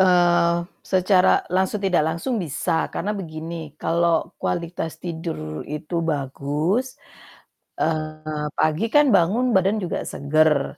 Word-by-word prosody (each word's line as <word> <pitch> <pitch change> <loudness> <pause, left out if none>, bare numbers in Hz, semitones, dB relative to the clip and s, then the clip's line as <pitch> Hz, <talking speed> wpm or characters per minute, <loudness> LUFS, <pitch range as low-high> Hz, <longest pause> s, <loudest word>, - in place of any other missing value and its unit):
Eee, 175 -2 +4 0.3
secara 185 0 +4
langsung 190 +2 +2
tidak 190 -4 +3
langsung 165 +11 -2
bisa, 160 +2 -1
karena 210 - -1
begini 160 -2 -7
kalau 170 -1 +1
kualitas 170 -1 -3
tidur 160 - -5
itu 150 +3 -6 0.2
bagus, 150 - -1 0.9
eee, 155 -1 -2
pagi 155 +7 +2
kan 295 0 +6
bangun 210 +8 +2
badan 190 +3 +3
juga 175 - -2
seger 150 0 +1
165 Hz, 110 wpm, -23 LUFS, 155-185 Hz, 0.9 s, kan